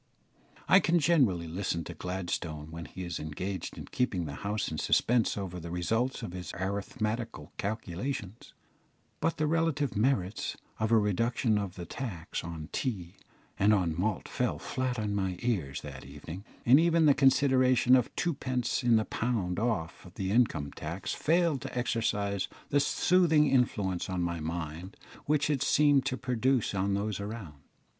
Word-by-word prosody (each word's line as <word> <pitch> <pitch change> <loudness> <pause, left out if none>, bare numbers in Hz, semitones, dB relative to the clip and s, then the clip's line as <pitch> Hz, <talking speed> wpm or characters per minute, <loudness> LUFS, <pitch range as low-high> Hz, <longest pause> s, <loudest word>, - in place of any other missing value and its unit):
I 190 - +7
can 175 -2 +2
generally 130 - +3
listen 85 0 -2
to - - -7
Gladstone 85 -4 -4
when 85 +1 -7
he 95 - -8
is 85 0 -4
engaged 90 +5 -5
in - - -7
keeping 95 -9 -1
the 70 - -5
House 105 +1 -1
in 80 - -3
suspense 115 +5 +2
over 90 -3 -4
the 85 0 -7
results 115 +9 -1
of - - -5
his 90 -1 -6
arithmetical 105 +4 -3
calculations; 105 +1 -4 0.6
but 165 - 0
the 155 - +1
relative 155 -3 +1
merits 105 -3 0 0.2
of 110 +1 0
a 115 - +6
reduction 110 +2 +1
of 100 -2 -4
the 90 - -6
tax 90 -7 -5
on 85 -2 -6
tea 95 -7 -3 0.4
and 105 +2 +5
on 90 -5 +1
malt 95 +3 -1
fell - - -1
flat 130 -1 -2
on 105 -2 -1
my 95 -3 -1
ears 85 - -1
that 70 -3 -8
evening, 90 +6 -9 0.2
and 130 +5 +7
even 165 -1 +4
the 145 - +7
consideration 130 -2 +4
of 125 -3 +2
twopence 130 -7 -1
in 120 -2 +4
the 110 -1 +3
pound 105 -7 -1
off 105 -7 -2
the 95 -2 -2
income 105 - +2
tax 85 +5 -5
failed 165 -2 +2
to - - -6
exercise 105 -5 0 0.2
that 145 - +3
soothing 160 +1 +4
influence 105 -10 +1
on 90 -2 -1
my 85 -1 -2
mind 85 +3 -5 0.3
which 150 0 +2
it 145 -4 0
seemed 145 -2 +4
to 130 -2 -1
produce 125 -2 +1
on 100 0 0
those 100 0 -2
around. 100 -9 -7
105 Hz, 160 wpm, -30 LUFS, 90-130 Hz, 0.6 s, I